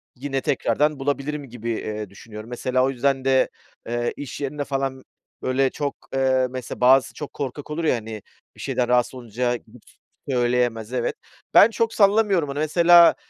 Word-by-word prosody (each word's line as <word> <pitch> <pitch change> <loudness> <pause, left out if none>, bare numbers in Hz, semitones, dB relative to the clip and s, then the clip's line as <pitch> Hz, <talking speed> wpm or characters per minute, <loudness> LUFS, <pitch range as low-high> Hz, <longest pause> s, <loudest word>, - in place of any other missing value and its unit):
Yine 135 0 -3
tekrardan 150 -1 +1
bulabilirim 140 0 -2
gibi, 115 0 -6
eee, 105 -2 -4
düşünüyorum. 110 +3 -11
Mesela 130 +1 0
o 135 - +2
yüzden 135 +1 0
de, 130 -1 +3 0.4
eee, 120 +1 -1
iş 145 0 -7
yerinde 145 +1 -3
falan, 135 -1 -3 0.4
böyle, 130 +1 +1
çok, 145 +1 -3 0.2
eee, 130 -1 +2
mesela 125 -1 -7
bazısı 130 +1 +5
çok 150 - -7
korkak 140 +2 -5
olur 165 +2 -3
ya, 155 - +3
hani, 110 -2 -6 0.3
bir - - -12
şeyden 125 - -1
rahatsız 125 0 +2
olunca 120 0 -2
gidip 115 0 -13
s - - -23 0.4
söyleyemez, 120 -2 0
evet. 120 -2 -1 0.4
Ben 210 - +8
çok 230 0 -1
sallamıyorum 200 -6 +3
onu 140 +1 -4
mesela, 170 +2 +6
130 Hz, 165 wpm, -23 LUFS, 120-145 Hz, 0.4 s, Ben